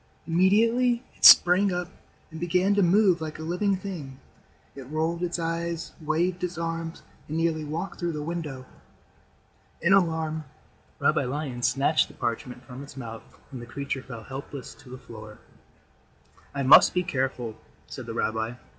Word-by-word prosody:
Immediately 230 +8 +3
it - - -21
sprang 185 +3 +8
up 180 -1 -2 0.4
and 160 - -8
began 180 +4 +2
to 200 - +3
move 185 -1 +4
like 155 -1 -5
a 155 - -7
living 180 +5 0
thing. 160 -9 -7 0.6
It 135 -2 -10
rolled 160 +3 -1
its 175 -1 -1
eyes, 165 0 -3
waved 170 +4 -1
its 180 -1 -3
arms, 165 0 -4 0.2
and 155 - -3
nearly 165 -1 0
walked 165 +5 -5
through 175 -2 -2
the 150 -1 -4
window. 150 -6 -5 1.1
In 180 +3 +3
alarm, 160 -4 +1 0.5
Rabbi - - +2
Lion 130 -2 -4
snatched 140 +5 +2
the - - -16
parchment 125 +2 -4
from 125 +1 -10
its 140 -1 -11
mouth 115 -4 -7 0.3
and 130 -3 -7
the 120 - -9
creature 140 +1 -4
fell 115 -3 -9
helpless 135 +1 -8
to - - -17
the 130 - -8
floor. 110 -4 -11 1.2
"I 140 - -1
must 135 +6 +7
be 180 - +2
careful," 130 -7 -2 0.3
said - - -9
the - - -5
rabbi. 110 +1 -1
160 Hz, 160 wpm, -26 LUFS, 135-175 Hz, 1.2 s, sprang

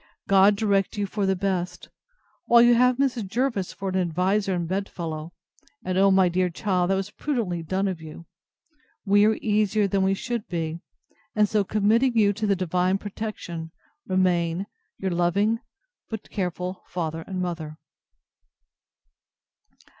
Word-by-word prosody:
God 195 +1 +6
direct 200 -2 +1
you 205 - 0
for 200 0 -2
the 190 - +2
best! 180 -1 -3 0.6
While 235 0 +7
you 240 0 +6
have 250 +1 +4
Mrs. 255 -6 0
Jervis 230 -3 -1
for 195 0 -5
an 190 - -1
adviser 185 +3 +1
and 170 -1 -2
bed 195 +3 -2
fellow, 160 -1 -5 0.5
(and, 185 0 -1
O 195 +1 +5
my 190 -1 +5
dear 180 +1 +1
child! 180 0 0
that 195 - +3
was 195 +2 -3
prudently 220 - -2
done 190 +4 -1
of 180 -4 -4
you,) 160 +1 -10 0.8
we 205 +1 +5
are 220 0 +3
easier 210 -1 +2
than 195 0 0
we 190 0 +2
should 235 +1 -4
be; 165 -1 -3 0.6
and 210 -1 +4
so 210 0 +1
committing 225 +5 +2
you 205 -2 +4
to 210 +1 -2
the 200 - +3
divine 185 +1 +1
protection, 195 -5 -6 0.4
remain 180 -1 +1 0.3
Your 190 -1 -2
truly 170 - -2
loving, 200 +6 +2 0.5
but 220 -2 -7
careful, 180 -1 -3
FATHER 165 -2 -3
and 190 -2 -4
MOTHER. 165 -4 -4
195 Hz, 155 wpm, -25 LUFS, 180-210 Hz, 0.8 s, While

